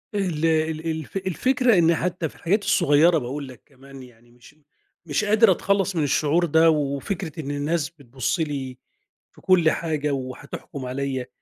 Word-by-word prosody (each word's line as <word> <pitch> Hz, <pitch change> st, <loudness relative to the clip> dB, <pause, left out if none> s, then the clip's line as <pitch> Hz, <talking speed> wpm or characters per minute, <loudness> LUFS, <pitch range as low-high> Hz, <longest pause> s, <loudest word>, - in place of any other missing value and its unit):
ال 175 Hz, -6 st, -1 dB
ال 160 Hz, 0 st, 0 dB
الف 160 Hz, +4 st, -5 dB
الفكرة 240 Hz, -, +1 dB
إن 170 Hz, 0 st, +4 dB
حتى 175 Hz, -1 st, -2 dB
في -, -, -20 dB
الحاجات 205 Hz, +5 st, 0 dB
الصغيرة، 165 Hz, -1 st, +4 dB
بقول 140 Hz, +2 st, -4 dB
لك 130 Hz, -2 st, -13 dB
كمان 135 Hz, -1 st, -14 dB
يعني، 120 Hz, -1 st, -19 dB
مش 125 Hz, +5 st, -19 dB, 0.5 s
مش 155 Hz, +7 st, -1 dB
قادر 215 Hz, 0 st, +5 dB
أتخلَّص 195 Hz, +1 st, 0 dB
من 160 Hz, -, +1 dB
الشعور 155 Hz, +4 st, +2 dB
ده، 160 Hz, +1 st, +4 dB
وفكرة 155 Hz, +3 st, -2 dB
إن 145 Hz, -2 st, -4 dB
الناس 150 Hz, +2 st, -1 dB
بتبُصّ 130 Hz, -2 st, -4 dB
لي 135 Hz, -5 st, -3 dB, 0.5 s
في -, -, -20 dB
كل 175 Hz, -4 st, +4 dB
حاجة 150 Hz, -3 st, -2 dB
وهتحكُم 135 Hz, +1 st, -6 dB
عليَّا، 130 Hz, 0 st, -3 dB
155 Hz, 160 wpm, -23 LUFS, 140-175 Hz, 0.5 s, قادر